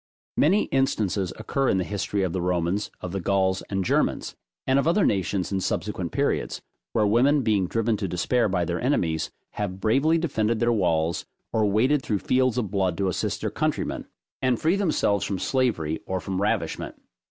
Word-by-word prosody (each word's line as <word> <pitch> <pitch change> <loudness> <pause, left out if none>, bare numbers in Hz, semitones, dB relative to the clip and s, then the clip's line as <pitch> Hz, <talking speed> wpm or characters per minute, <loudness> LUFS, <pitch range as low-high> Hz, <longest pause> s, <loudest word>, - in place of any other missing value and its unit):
Many 190 +8 +4
instances 105 -8 +1
occur 135 -2 0
in - - +2
the 95 - +1
history 100 +1 -2
of 90 -3 -1
the 95 - -1
Romans 90 +3 0
of 90 - -5
the 95 - -2
Gauls 95 0 +1
and 95 -2 -1
Germans, - - 0 0.3
and 130 +1 +3
of 140 - 0
other 185 +4 +3
nations 95 -1 0
in 95 - 0
subsequent - - -2
periods; - - -1 0.3
where 110 - +3
women 130 +7 +3
being 105 -5 +2
driven 115 +2 0
to 100 -1 -2
despair 105 +7 +1
by 90 -2 0
their 85 +1 -2
enemies, 85 - 0 0.2
have 95 -2 -4
bravely 135 +10 +3
defended 115 -9 0
their 120 0 +3
walls, 85 -5 0 0.3
or 110 -2 +3
waded 125 +8 +3
through 105 -5 -1
fields 130 +3 +1
of 105 -6 -1
blood 95 -4 0
to 95 -1 +1
assist 90 - -2
their - - -2
countrymen, - - -2 0.3
and 130 -2 +2
free 165 +4 +2
themselves 155 - +1
from 100 - -2
slavery 95 - 0
or 95 0 -1
from 95 0 -3
ravishment. 105 - -2
105 Hz, 185 wpm, -25 LUFS, 95-125 Hz, 0.3 s, Many